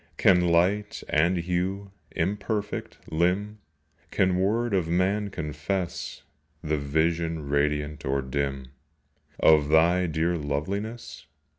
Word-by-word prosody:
Can 90 -2 +5
light 90 +5 +1
and 85 +4 +3
hue, 90 +3 -2 0.2
imperfect, 105 +3 -3
limn, 95 +6 0 0.5
Can 95 -1 +1
word 110 +4 +1
of 90 -4 +1
man 95 +4 +1
confess 85 +3 -4 0.4
The 75 -2 0
vision 80 +2 0
radiant 75 +1 0
or 70 0 0
dim 70 -1 -3 0.7
Of 75 -2 +5
thy 85 +3 +4
dear 80 +2 0
loveliness? 100 +11 -4
85 Hz, 105 wpm, -26 LUFS, 75-95 Hz, 0.7 s, Can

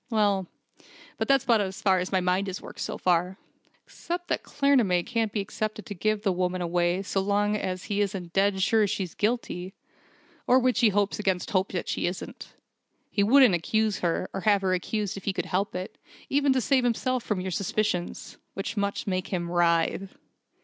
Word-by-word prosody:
Well 205 -5 +1 0.7
but - - 0
that's 275 -2 +4
about 230 -3 +3
as 190 -1 -4
far 190 -3 +3
as 180 - -3
my 190 -1 +2
mind 180 +2 +1
has 190 -1 -4
worked, - - -11
so - - -3
far. 180 +1 +1 0.5
Except 350 +1 -6
that - - 0
Claremanagh 245 -12 +2
can't 225 -3 -1
be 205 - -1
expected 215 +1 -4
to 210 - -6
give 215 +3 -1
the 200 - +2
woman 180 0 -1
away 175 +1 0
so 195 - -1
long 205 +1 +1
as 185 -3 -3
he 205 0 -1
isn't 190 -4 -3
dead 195 -1 +2
sure 220 0 +3
she's 185 -3 -3
guilty 205 -4 -2 0.7
or 250 - +6
which 255 -1 +2
he 230 - +5
hopes 205 0 0
against 190 0 -1
hope 190 -2 +1
that 180 - -3
she - - -1
isn't. 180 +1 -7 0.6
He 205 - +1
wouldn't 245 +1 +6
accuse 215 +5 0
her, 175 +1 -1
or 195 - -3
have 205 -2 +3
her 185 -1 +2
accused 200 +2 -2
if 195 - -9
he 200 - 0
could - - -3
help 195 +2 -1
it, 185 +1 -6 0.3
even 280 0 +3
to 260 - +1
save 260 +2 +2
himself 245 +1 0
from 210 -3 -1
your 185 0 -3
suspicions, 180 -1 -2 0.2
which 195 +3 -4
must 200 -1 -1
make 185 -1 -2
him 175 -2 -3
writhe!" 175 +2 +2
195 Hz, 195 wpm, -27 LUFS, 185-215 Hz, 0.7 s, or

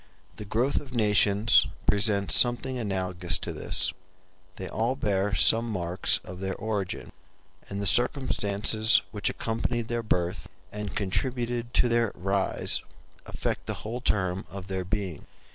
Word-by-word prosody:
The 105 - -7
growth 120 +7 0
of 130 -3 -11
nations 105 -1 +4 0.2
presents 100 -1 +2
something 125 +1 +4
analogous 90 -5 -1
to - - -5
this: - - -1 0.6
they 95 - -6
all 115 +7 -1
bear 100 -4 -1
some 115 +4 +5
marks 90 -3 +1
of 90 0 -9
their 95 0 -3
origin; 105 -2 -4 0.6
and 100 - -4
the 100 - -3
circumstances 110 -1 +3
which 105 -2 -1
accompanied 115 +1 -3
their 120 0 -1
birth 90 -5 -2 0.2
and 105 -1 -6
contributed 120 +3 -2
to - - +4
their 115 -2 +1
rise 95 +1 -1 0.5
affect - - -4
the - - -2
whole 120 +3 -4
term 95 -5 -1
of 95 -1 -9
their 95 -1 -2
being. 95 -4 -4
105 Hz, 140 wpm, -27 LUFS, 95-115 Hz, 0.6 s, some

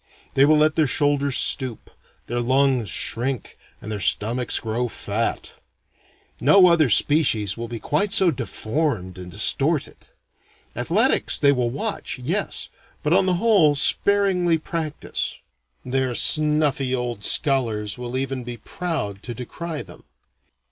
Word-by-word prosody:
They 135 - +5
will 155 +1 +4
let 155 +1 +2
their 155 -2 +3
shoulders 140 -1 +2
stoop, 130 -5 0 0.3
their 120 +1 -3
lungs 130 -2 +1
shrink, 125 +1 -2 0.2
and 110 - -8
their 105 - -3
stomachs 115 +5 +1
grow 115 +2 -2
fat. 110 0 -3 0.9
No 180 +9 +6
other 170 -6 +4
species 110 - +2
will 115 0 -6
be 115 -1 -7
quite 200 - -1
so 190 -3 +5
deformed 115 - -3
and 90 -1 -9
distorted. 135 - +2 0.7
Athletics - - +1
they 140 - +4
will 125 -3 0
watch, 205 - -4
yes, 165 +11 -2 0.4
but 150 - +1
on 190 +1 +3
the 185 - +2
whole 185 -8 +3
sparingly 180 +1 +2
practise. 160 -2 -4 0.5
Their 130 -1 -1
snuffy 150 -4 +1
old 120 -4 -4
scholars 110 -7 0
will 125 +1 -5
even 135 -1 -3
be 120 0 -7
proud 130 - -5
to 120 0 -7
decry 155 +6 -6
them. - - -16
135 Hz, 135 wpm, -22 LUFS, 120-155 Hz, 0.9 s, No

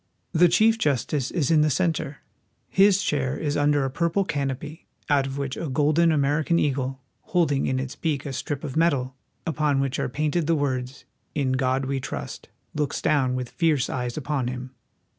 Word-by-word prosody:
The 175 +2 +5
chief 220 +6 +4
justice 140 - 0
is 165 -4 0
in 155 -2 +5
the 155 - +3
center. 155 -2 -1 0.5
His 200 0 +4
chair 135 -2 0
is 145 -2 -2
under 145 -1 +2
a 135 - -2
purple 170 +6 0
canopy, 145 0 -4 0.2
out 140 -2 +3
of 135 0 -5
which 140 -2 -3
a 165 - -4
golden 155 +4 +3
American 150 +3 +2
eagle, 135 -3 0 0.2
holding 155 -6 +1
in 130 - 0
its 130 0 -5
beak 150 -3 -2
a 140 - -4
strip 145 +2 -4
of 140 -4 -5
metal, 140 -6 +1 0.3
upon 150 -4 +1
which 135 -1 -1
are - - -1
painted 150 +4 -1
the 165 - +3
words, 130 -3 -2
" - - -45
In 140 -3 +1
God 130 +1 +1
we 135 0 -1
trust," - - -6 0.2
looks 150 -2 -1
down 135 -4 +2
with 125 -1 -3
fierce 155 -6 +1
eyes 125 0 -3
upon 145 -4 -1
him. 125 +1 -5
145 Hz, 185 wpm, -25 LUFS, 130-155 Hz, 0.5 s, The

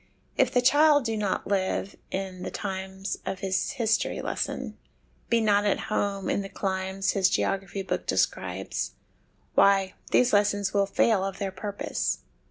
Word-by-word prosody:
If - - +3
the 250 - +2
child 290 +1 +5
do 225 -1 0
not 205 -3 -1
live 195 0 -1
in 190 -1 -4
the - - -3
times 190 +1 -4
of 190 - -4
his 190 -1 0
history 230 -4 0
lesson, - - -3 0.5
be 235 - +4
not 205 -2 +3
at 205 - +1
home 200 -2 -1
in - - +1
the 195 - -6
climes 190 0 -1
his 190 -2 +3
geography 195 0 -1
book - - -3
describes, - - -1 0.6
why, 195 -1 +4 0.2
these 250 -2 +3
lessons 205 -1 +2
will 200 -1 +3
fail 200 0 +3
of 195 -1 -3
their 195 -1 -2
purpose. 200 +2 -3
195 Hz, 155 wpm, -27 LUFS, 190-210 Hz, 0.6 s, child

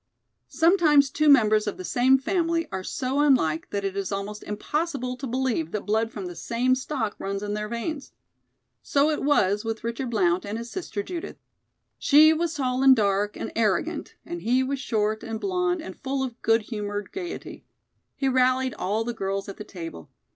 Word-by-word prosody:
Sometimes 315 -5 +4
two 305 +1 +2
members 215 -6 +5
of 205 - -3
the 185 - -7
same 255 +7 +4
family 330 +2 0
are 190 0 -4
so 260 +6 -2
unlike 250 - +2
that 200 -1 -3
it 195 0 -2
is 200 -1 -3
almost 200 +2 -4
impossible 255 +4 -2
to 265 +2 -6
believe 245 -10 -1
that 210 +3 -4
blood 220 +2 +1
from 200 -4 -6
the 175 -1 -6
same 240 +7 0
stock 255 -4 -2
runs 195 +1 -3
in 205 0 -3
their 210 0 -3
veins. 265 +5 -4 0.7
So 285 +2 +2
it 300 - -2
was 210 -8 +2
with 225 -1 -4
Richard 235 +2 -3
Blount 185 -5 +2
and 205 +1 -4
his 235 +1 -7
sister, 275 - -4
Judith. 340 - -6 0.6
She 310 +1 +6
was 330 0 -1
tall 255 -2 -1
and 270 -1 +8
dark 205 -1 +1
and - - -5
arrogant, 210 -6 0
and 175 0 -6
he 245 +6 +2
was 275 +1 -2
short 220 -4 -1
and 225 -1 -5
blond 360 - 0
and - - -8
full 270 -1 -2
of 245 -2 -6
good 225 0 +3
humored 205 -2 -5
gayety. 360 -2 -7 0.5
He 275 -2 -1
rallied 255 -1 +2
all 205 +5 0
the 240 +1 -3
girls 195 -2 -3
at 200 - -8
the - - -6
table. 165 - -9
235 Hz, 190 wpm, -25 LUFS, 205-275 Hz, 0.7 s, and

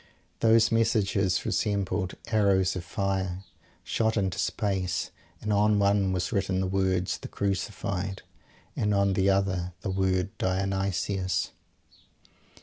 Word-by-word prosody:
Those 115 0 +5
messages 100 -4 +2
resembled 100 -3 -1
arrows 100 -4 +3
of 90 - -4
fire, 95 0 -2 0.4
shot 110 0 0
into 95 -3 0
space; 95 -4 -1 0.3
and 105 0 -1
on 105 +1 +3
one 100 -1 +3
was 90 -2 -1
written 95 -1 0
the 95 - 0
words 95 -1 0
"The - - -7
Crucified" 100 -1 -3 0.5
and 105 -1 +1
on 100 0 +3
the 95 +1 +2
other 95 -2 0
the 95 - -2
word 95 0 0
"Dionysus." 95 0 -1
95 Hz, 120 wpm, -27 LUFS, 95-100 Hz, 0.5 s, Those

